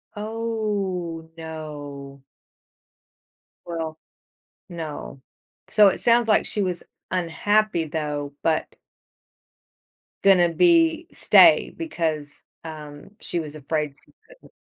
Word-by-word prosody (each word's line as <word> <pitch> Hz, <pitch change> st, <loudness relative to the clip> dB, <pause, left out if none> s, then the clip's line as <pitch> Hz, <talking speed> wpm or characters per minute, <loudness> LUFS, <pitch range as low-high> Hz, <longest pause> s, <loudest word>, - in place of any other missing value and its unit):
Oh, 205 Hz, -7 st, -3 dB
no. 145 Hz, -4 st, -8 dB, 1.4 s
Well, 165 Hz, -2 st, -4 dB, 0.7 s
no. 155 Hz, -5 st, -7 dB, 0.5 s
So, 210 Hz, -2 st, +6 dB
it -, -, -1 dB
sounds 235 Hz, -1 st, +3 dB
like 215 Hz, -, +3 dB
she 210 Hz, -, -1 dB
was 180 Hz, -2 st, -2 dB, 0.3 s
unhappy, 185 Hz, +1 st, +1 dB
though, 150 Hz, -2 st, -4 dB
but 160 Hz, -1 st, 0 dB, 1.5 s
gonna 180 Hz, -3 st, +5 dB
be 330 Hz, -, +3 dB
stay, -, -, +6 dB
because, 160 Hz, -, -2 dB, 0.3 s
um, 150 Hz, +1 st, -9 dB
she 175 Hz, -, -3 dB
was 155 Hz, -2 st, -7 dB
afraid 150 Hz, 0 st, -2 dB
she -, -, -25 dB, 0.2 s
couldn't -, -, -19 dB
165 Hz, 95 wpm, -24 LUFS, 155-210 Hz, 1.5 s, So